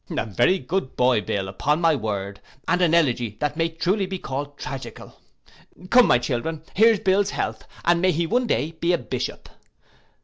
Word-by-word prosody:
'A -, -, -2 dB
very 115 Hz, -, +2 dB
good 185 Hz, -6 st, -3 dB
boy, 125 Hz, -3 st, +3 dB
Bill, 95 Hz, 0 st, -3 dB
upon 145 Hz, -, 0 dB
my 165 Hz, -2 st, +3 dB
word, 100 Hz, -4 st, -4 dB, 0.3 s
and 180 Hz, +1 st, +1 dB
an 170 Hz, -2 st, +4 dB
elegy 120 Hz, -9 st, +1 dB
that 145 Hz, 0 st, -1 dB
may 165 Hz, 0 st, 0 dB
truly 185 Hz, +5 st, -1 dB
be 190 Hz, 0 st, -4 dB
called 140 Hz, -2 st, -5 dB
tragical. 135 Hz, -2 st, -8 dB, 0.7 s
Come, 250 Hz, 0 st, +7 dB
my 120 Hz, -, +5 dB
children, 130 Hz, +6 st, -3 dB
here's 220 Hz, +1 st, +5 dB
Bill's 200 Hz, 0 st, +2 dB
health, -, -, -4 dB, 0.2 s
and 170 Hz, 0 st, +3 dB
may 185 Hz, 0 st, +3 dB
he 170 Hz, +1 st, 0 dB
one 245 Hz, +8 st, 0 dB
day 160 Hz, -7 st, 0 dB
be 170 Hz, +2 st, -1 dB
a -, -, +3 dB
bishop. 120 Hz, -, -5 dB
160 Hz, 180 wpm, -23 LUFS, 125-185 Hz, 0.7 s, Come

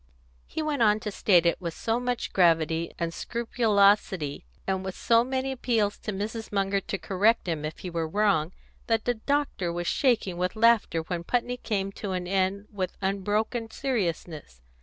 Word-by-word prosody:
He 315 Hz, -, -3 dB
went 295 Hz, -4 st, -1 dB
on 210 Hz, -1 st, +4 dB
to 210 Hz, -, -4 dB
state 180 Hz, -3 st, +3 dB
it, 170 Hz, -, +1 dB
with 170 Hz, -2 st, -4 dB
so 230 Hz, +1 st, -1 dB
much 245 Hz, -1 st, -2 dB
gravity 165 Hz, -2 st, +3 dB
and 170 Hz, -1 st, -2 dB
scrupulosity, 200 Hz, -, +1 dB, 0.2 s
and 190 Hz, -1 st, -1 dB
with 190 Hz, -1 st, -5 dB
so 230 Hz, 0 st, +3 dB
many 260 Hz, +1 st, -2 dB
appeals 230 Hz, -5 st, 0 dB
to 215 Hz, -, -4 dB
Mrs. 215 Hz, +3 st, -4 dB
Munger 195 Hz, -1 st, +1 dB
to 195 Hz, -, -4 dB
correct 205 Hz, +3 st, +2 dB
him 160 Hz, -3 st, -2 dB
if 155 Hz, +1 st, -4 dB
he 185 Hz, -, -6 dB
were 165 Hz, -1 st, -1 dB
wrong, 185 Hz, -3 st, +1 dB, 0.4 s
that 225 Hz, -1 st, +1 dB
the 245 Hz, -, +2 dB
doctor 245 Hz, -7 st, -1 dB
was 175 Hz, 0 st, -3 dB
shaking 220 Hz, -6 st, +1 dB
with 180 Hz, +3 st, -1 dB
laughter 220 Hz, -7 st, +3 dB
when 170 Hz, +1 st, -4 dB
Putney 245 Hz, +5 st, -1 dB
came 200 Hz, -5 st, -2 dB
to 195 Hz, -1 st, -5 dB
an 180 Hz, -1 st, -2 dB
end 195 Hz, +2 st, 0 dB
with 190 Hz, -3 st, -4 dB
unbroken 205 Hz, +4 st, -1 dB
seriousness. 170 Hz, -, -3 dB
200 Hz, 175 wpm, -27 LUFS, 175-230 Hz, 0.4 s, on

